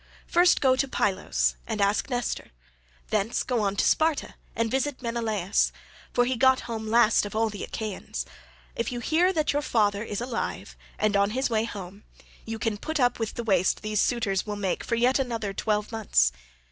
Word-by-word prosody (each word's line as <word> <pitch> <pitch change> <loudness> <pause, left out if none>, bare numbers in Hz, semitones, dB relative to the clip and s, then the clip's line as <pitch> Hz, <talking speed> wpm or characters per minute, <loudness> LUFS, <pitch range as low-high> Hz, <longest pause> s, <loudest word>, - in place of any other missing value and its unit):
First 350 +1 +4
go 260 -2 +4
to 275 - +1
Pylos 60 - 0
and 210 - -3
ask 200 +6 +1
Nestor; 245 -2 -2 0.6
thence 215 +4 0
go 245 -3 0
on 200 -1 0
to - - +1
Sparta 315 -2 +2 0.2
and 225 -1 0
visit 265 0 -1
Menelaus, 220 -5 0 0.4
for 245 - +3
he 255 +1 0
got 260 +1 +4
home 225 -2 -5
last 230 0 +4
of 205 +1 -6
all 220 0 +1
the 205 - -6
Achaeans; 215 -3 -5 0.5
if 230 - -2
you 245 - -3
hear 335 +8 +2
that 310 -5 0
your 290 - +1
father 210 -6 +1
is 210 -3 -4
alive 240 -1 -4 0.2
and 215 -1 +1
on 200 0 +3
his 260 -2 0
way 220 0 +2
home, 200 -2 -8 0.4
you 225 0 -4
can 220 -2 -2
put 315 +4 -3
up 245 -2 +2
with 225 -2 -3
the 235 - -3
waste 190 -4 +2
these 215 -1 +1
suitors 210 -6 +1
will 210 -1 -4
make 195 -3 -2
for 235 - -1
yet 250 +4 +3
another 230 -6 -2
twelve 210 +2 -1
months. 190 - +2
225 Hz, 190 wpm, -26 LUFS, 205-250 Hz, 0.6 s, First